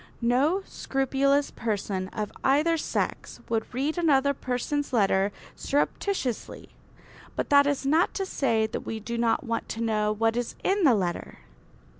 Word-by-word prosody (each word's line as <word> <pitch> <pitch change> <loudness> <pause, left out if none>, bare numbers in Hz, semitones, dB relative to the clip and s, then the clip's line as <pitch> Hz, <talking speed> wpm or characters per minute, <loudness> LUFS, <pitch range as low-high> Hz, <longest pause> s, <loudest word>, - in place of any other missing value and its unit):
No 285 +11 +2
scrupulous 275 +1 0
person 200 -4 -2
of 210 +1 -4
either 300 +5 +3
sex 320 - -3
would 225 -1 -1
read 285 +7 -1
another 280 -4 +3
person's 280 +3 -2
letter 195 -3 +3 0.2
surreptitiously. 285 - -2 0.7
But - - -3
that 285 0 +6
is 285 -1 -1
not 315 +5 +2
to 390 - -1
say 230 -11 +1
that 220 - -4
we 220 - -5
do 235 +2 -5
not 235 +5 +1
want 230 -3 -3
to 225 - -4
know 215 -2 +1
what 225 +1 +1
is 245 -1 -2
in 390 -2 +2
the 255 -5 +6
letter. 180 -4 -3
255 Hz, 150 wpm, -27 LUFS, 225-290 Hz, 0.7 s, that